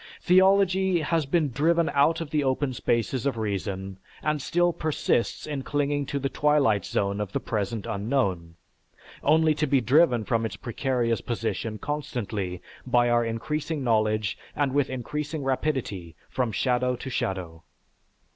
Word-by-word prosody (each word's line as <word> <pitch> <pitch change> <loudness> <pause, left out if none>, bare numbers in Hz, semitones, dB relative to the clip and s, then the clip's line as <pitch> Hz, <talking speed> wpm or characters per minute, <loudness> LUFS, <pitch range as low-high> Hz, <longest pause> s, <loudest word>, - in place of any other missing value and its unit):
Theology 190 -1 +4
has 160 -1 0
been 150 -1 +1
driven 165 +6 +2
out 155 +4 +3
of 155 -3 -6
the 150 -2 +1
open 130 0 0
spaces 120 +2 0
of 135 - -1
reason 95 -2 -3 0.2
and 150 -1 0
still 175 +4 +2
persists 155 -7 -1
in 145 -3 -3
clinging 145 0 -1
to 140 - -2
the 140 0 -1
twilight 140 -9 +2
zone 100 +1 -1
of 100 -2 -5
the - - 0
present 105 0 -3
unknown, 100 -6 -1 0.7
only 155 +1 +4
to 150 0 -1
be 135 0 +3
driven 125 -1 +4
from 115 0 0
its 110 -4 -3
precarious 120 0 -1
position 115 -1 -3
constantly 110 -10 -4 0.2
by 120 -1 +2
our 120 0 +3
increasing 145 +6 -3
knowledge 110 -3 +1 0.2
and 140 -2 0
with 140 -1 +2
increasing 150 +4 -4
rapidity 130 - -2 0.2
from 125 -3 0
shadow 125 +3 +1
to 130 +2 -7
shadow. 90 -7 -3
130 Hz, 145 wpm, -26 LUFS, 110-150 Hz, 0.7 s, Theology